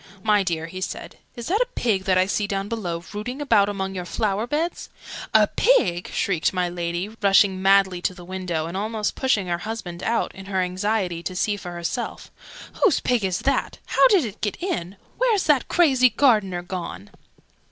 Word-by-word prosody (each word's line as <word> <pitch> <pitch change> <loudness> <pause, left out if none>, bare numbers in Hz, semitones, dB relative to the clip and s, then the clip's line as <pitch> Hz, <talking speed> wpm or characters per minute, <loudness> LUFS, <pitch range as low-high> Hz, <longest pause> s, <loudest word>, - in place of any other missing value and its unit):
"My 210 -2 +4
dear," 170 -4 -2
he 185 +3 -8
said, - - -6 0.2
"is 235 -2 -7
that 405 +8 +1
a - - +2
pig 200 -6 0
that 185 -1 +3
I 185 - +4
see 205 +1 -1
down 195 0 -2
below, 175 -7 -4
rooting 245 +6 -5
about 205 -8 +3
among 190 -1 -3
your 180 -1 -4
flower 210 +4 -1
beds?" 315 +6 -2 0.4
"A - - +6
pig!" 180 - +2
shrieked 185 -3 0
my 180 -1 0
Lady, 175 +2 -3
rushing 195 -1 +4
madly 190 -2 +4
to 180 +1 -1
the 175 -1 -11
window, 180 -3 -3
and 170 +2 -6
almost 215 +2 -2
pushing 255 -7 +1
her 175 -1 -2
husband 180 -4 -6
out, 230 +4 -1
in 190 0 -11
her 190 -1 -1
anxiety 185 -1 -1
to 185 +1 -5
see 205 +3 0
for 180 -3 -8
herself. 175 +8 -4 0.5
"Whose 400 - +4
pig 245 -4 0
is 185 -2 -1
it? - - -8 0.4
How - - +5
did 395 - +3
it 210 -1 -8
get 205 - -2
in? 195 - -3 0.2
Where's 465 -6 +2
that 290 -5 +2
crazy 265 -8 +4
Gardener 210 -10 +2
gone?" 170 - -6
195 Hz, 190 wpm, -23 LUFS, 180-230 Hz, 0.5 s, A